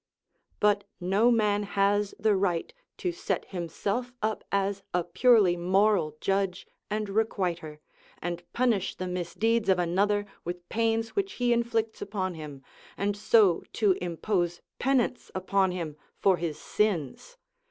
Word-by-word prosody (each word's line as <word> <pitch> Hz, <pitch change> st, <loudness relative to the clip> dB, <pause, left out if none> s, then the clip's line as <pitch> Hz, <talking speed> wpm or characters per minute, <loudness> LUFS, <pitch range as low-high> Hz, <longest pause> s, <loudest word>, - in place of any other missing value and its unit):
But 205 Hz, -1 st, +3 dB, 0.2 s
no 195 Hz, +6 st, +3 dB
man 210 Hz, -3 st, +3 dB
has 200 Hz, 0 st, +1 dB
the 215 Hz, 0 st, +2 dB
right 185 Hz, -, 0 dB, 0.2 s
to 360 Hz, -, -1 dB
set 345 Hz, +2 st, -2 dB
himself 200 Hz, +7 st, -3 dB
up 215 Hz, 0 st, -1 dB
as 200 Hz, 0 st, 0 dB
a 180 Hz, -, +2 dB
purely 195 Hz, +1 st, +4 dB
moral 180 Hz, -3 st, +2 dB
judge 195 Hz, -2 st, 0 dB, 0.2 s
and 215 Hz, 0 st, -1 dB
requiter, 185 Hz, -7 st, -1 dB, 0.4 s
and 175 Hz, 0 st, -4 dB
punish 235 Hz, -6 st, +1 dB
the 185 Hz, -, -4 dB
misdeeds 185 Hz, +5 st, 0 dB
of 190 Hz, -, +5 dB
another 200 Hz, +4 st, +1 dB, 0.2 s
with 175 Hz, 0 st, -6 dB
pains 225 Hz, 0 st, +1 dB
which 390 Hz, -, -2 dB
he 245 Hz, -1 st, +2 dB
inflicts 230 Hz, -2 st, -1 dB
upon 190 Hz, -3 st, -2 dB
him, 150 Hz, -4 st, -9 dB, 0.3 s
and 200 Hz, 0 st, 0 dB
so 205 Hz, -3 st, +4 dB
to 210 Hz, -3 st, +3 dB
impose 175 Hz, 0 st, -1 dB, 0.2 s
penance 260 Hz, -2 st, +1 dB
upon 190 Hz, 0 st, +1 dB
him 165 Hz, -5 st, -4 dB, 0.2 s
for 190 Hz, -2 st, +3 dB
his 165 Hz, -3 st, -3 dB
sins. 210 Hz, -, -1 dB
200 Hz, 135 wpm, -28 LUFS, 175-220 Hz, 0.4 s, of